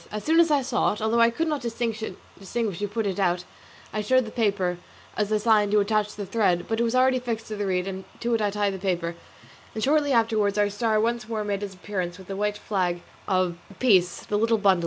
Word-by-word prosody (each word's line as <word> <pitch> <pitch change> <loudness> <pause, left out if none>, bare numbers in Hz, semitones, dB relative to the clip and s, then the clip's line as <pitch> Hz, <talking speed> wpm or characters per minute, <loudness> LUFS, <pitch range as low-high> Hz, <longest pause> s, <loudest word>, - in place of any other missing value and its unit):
As 210 0 -4
soon 325 +2 +3
as 335 -1 +5
I 290 -3 +3
saw 250 -4 +1
it, 210 - -7
although 220 +2 +1
I 230 0 +6
could 320 +8 -2
not 300 -3 -1
distinguish 225 -3 -4
who 205 - -1
put 220 +2 -2
it 195 -1 -2
out, 180 -2 +1 0.5
I 215 - -1
showed 255 +4 +3
the 220 - -8
paper 195 -6 0 0.4
as 210 0 -1
a 215 - +3
sign 210 -1 +3
to 210 +1 +4
attach 210 0 0
the 205 - -5
thread, 190 -4 +1
but 225 0 -1
it - - +3
was 235 +1 0
already 255 0 +4
fixed 230 -3 -4
to 215 - -3
the 205 -1 -2
reed, 180 0 0
and 190 0 -5 0.2
to 235 0 0
it 225 - +1
I 205 - +2
tied 205 -1 0
the 190 - -6
paper; 175 -3 -1 0.6
and 220 - -2
shortly 290 0 +3
afterwards 220 -4 +2
our 205 -1 +2
star 215 +1 +1
once 235 0 -1
more 220 -2 -2
made 205 -1 -2
its 200 -2 -5
appearance 185 -2 -4
with 190 -1 -14
the 195 - -3
white 210 +1 -1
flag 180 -4 -1 0.2
of 185 -3 +1 0.2
peace, 185 -8 +3
the 205 - 0
little 225 +1 +3
bundle. 195 -3 +4
210 Hz, 240 wpm, -25 LUFS, 195-230 Hz, 0.6 s, I